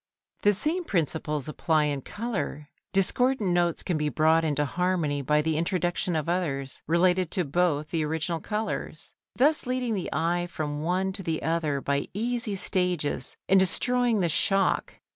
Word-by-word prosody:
The 205 - +4
same 310 - 0
principles 155 - -1
apply 155 +1 +1
in 145 -2 -1
colour, 155 - -4 0.2
discordant 210 +2 +2
notes 175 -1 +1
can 175 -5 -1
be 150 0 0
brought 160 +4 +3
into 150 -2 +1
harmony 170 -2 0
by 150 +3 +2
the 160 -1 0
introduction 175 0 0
of 155 -1 -1
others 145 -7 -2
related 180 +2 +3
to 180 - 0
both 155 0 0
the 165 -2 0
original 160 +2 -2
colours, 215 +5 -4 0.2
thus 295 0 +3
leading 250 -2 -1
the 190 -4 -2
eye 175 +2 0
from 150 -4 -4
one 185 +4 0
to 195 - -3
the 165 -3 -2
other 155 -4 0
by 140 +1 -1
easy 235 -1 -1
stages 180 -8 -1
and 195 - +5
destroying 240 +4 +2
the 170 - +1
shock. 195 +5 +1
175 Hz, 160 wpm, -27 LUFS, 150-195 Hz, 0.2 s, and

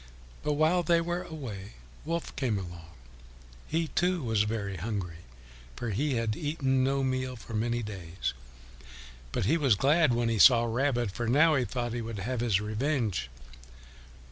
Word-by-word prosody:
But 150 0 0
while 155 +4 +3
they 170 0 +3
were 175 +1 -2
away 125 - -7 0.3
Wolf 165 +1 -3
came 120 -6 0
along. 85 -3 -7 0.8
He, 160 0 -1
too, 180 -2 +1
was 110 -3 +2
very 100 -3 -3
hungry, 95 -3 -4 0.6
for 120 -2 -3
he 135 +7 0
had 115 -2 0
eaten 135 -2 0
no 135 +1 +1
meal 130 -1 -1
for 115 -1 -10
many 120 +2 0
days, 90 -8 -4 1.0
but - - -1
he 155 - +3
was 135 -9 +4
glad 145 - +4
when 120 0 +1
he 115 -2 0
saw 120 -1 +8
Rabbit, 120 -1 0
for 120 +4 -3
now 150 +7 +5
he 130 -4 +2
thought 120 +2 -3
he 120 - -2
would 115 -1 -5
have 120 +5 -3
his 115 -5 +2
revenge. 110 - -1
120 Hz, 165 wpm, -29 LUFS, 105-145 Hz, 1.0 s, saw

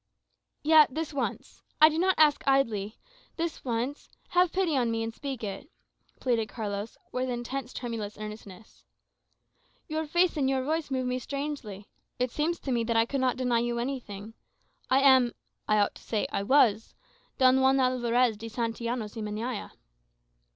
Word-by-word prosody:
"Yet, 305 -3 +6
this 320 -1 -3
once. 280 - -4 0.2
I 310 - +9
do 315 +1 0
not 375 +1 +3
ask 300 -2 +5
idly 225 -7 +1 0.4
this 335 -1 -3
once 245 +3 -3 0.2
have 360 -1 +3
pity 365 -5 +1
on 245 -3 +2
me, 225 0 -1
and 225 0 -4
speak 265 -2 -6
it," 205 +8 -6 0.5
pleaded 235 -4 0
Carlos, 205 -1 -5
with 255 0 -2
intense 245 +1 -4
tremulous 225 -4 -5
earnestness. 210 -1 -10 1.0
"Your 315 0 -2
face 345 +2 +2
and 270 -2 +2
your 265 -1 0
voice 315 +2 -1
move 260 -1 -1
me 250 0 -1
strangely; 275 -8 -5 0.3
it 250 -1 -1
seems 320 +5 0
to 270 - -3
me 235 -2 +1
that 230 0 +1
I 225 - +4
could 275 +2 -2
not 255 -1 +1
deny 250 -2 +1
you 240 0 -1
anything. 230 -5 -5 0.6
I 265 +1 +4
am 260 -3 +5 0.3
I 215 - +3
ought 205 -1 +2
to - - -14
say, 215 -2 -1
I - - -1
was 225 -2 +3 0.4
Don 260 0 +5
Juan 265 +1 +4
Alvarez 250 -2 +2
de 225 +2 -7
Santillanos 230 -1 -3
y 225 - -5
Meñaya." 215 +2 -4
250 Hz, 165 wpm, -28 LUFS, 225-275 Hz, 1.0 s, I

